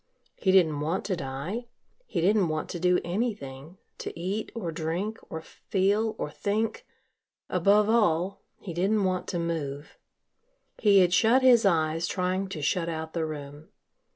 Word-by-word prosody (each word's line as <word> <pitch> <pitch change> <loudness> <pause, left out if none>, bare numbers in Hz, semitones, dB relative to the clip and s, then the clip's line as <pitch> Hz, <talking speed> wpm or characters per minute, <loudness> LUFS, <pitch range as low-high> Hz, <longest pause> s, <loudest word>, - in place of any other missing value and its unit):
He 190 - +1
didn't 165 -6 +4
want 160 +6 -1
to 195 - 0
die, 170 - -5 0.4
he 175 - -2
didn't 195 +1 +3
want 155 -1 -3
to 175 - -4
do 180 +1 +3
anything, 175 - -4 0.2
to - - -6
eat 195 +5 -3
or 185 -8 -3
drink 170 +8 -3
or 160 0 -6
feel 205 +6 0
or 150 - -4
think 220 - -2 0.6
above 205 +1 +4
all, 195 -4 +2 0.2
he 180 - -7
didn't 200 +5 +1
want 185 -1 -1
to 175 - -2
move. 155 -4 -4 0.8
He 200 -3 +6
had 180 -1 +3
shut 235 +6 +4
his 240 -5 +6
eyes 165 -1 +1
trying 185 +1 -1
to 155 -6 -5
shut 170 +2 0
out 160 -1 -5
the 165 -2 -1
room. 145 0 -8
180 Hz, 155 wpm, -27 LUFS, 160-205 Hz, 0.8 s, He